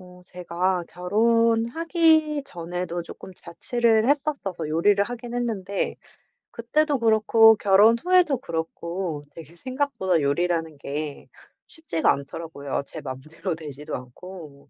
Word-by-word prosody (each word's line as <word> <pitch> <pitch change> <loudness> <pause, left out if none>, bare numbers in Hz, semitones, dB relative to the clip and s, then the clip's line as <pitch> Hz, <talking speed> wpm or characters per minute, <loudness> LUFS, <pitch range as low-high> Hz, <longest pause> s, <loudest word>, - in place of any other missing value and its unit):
어 180 0 -15
제가 180 0 -2
결혼하기 235 - +2
전에도 175 -2 -5
쪼끔 185 - -11
자취를 225 +6 0
했었어서 275 - -1
요리를 195 +6 +3
하긴 240 +1 -7
했는데 210 -5 -2 0.6
그때도 290 +5 0
그렇고 225 0 +5
결혼 205 +3 +5
후에도 360 -6 +4
그렇고 170 - -4
되게 165 0 -12
생각보다 255 - -1
요리라는 165 +2 0
게 145 +1 -5 0.4
쉽지가 245 - 0
않더라고요 140 0 -4
제 155 - -9
맘대로 155 +7 -5
되지도 150 -2 -7
않고. 140 +3 -11
185 Hz, 280 characters per minute, -24 LUFS, 165-235 Hz, 0.6 s, 그렇고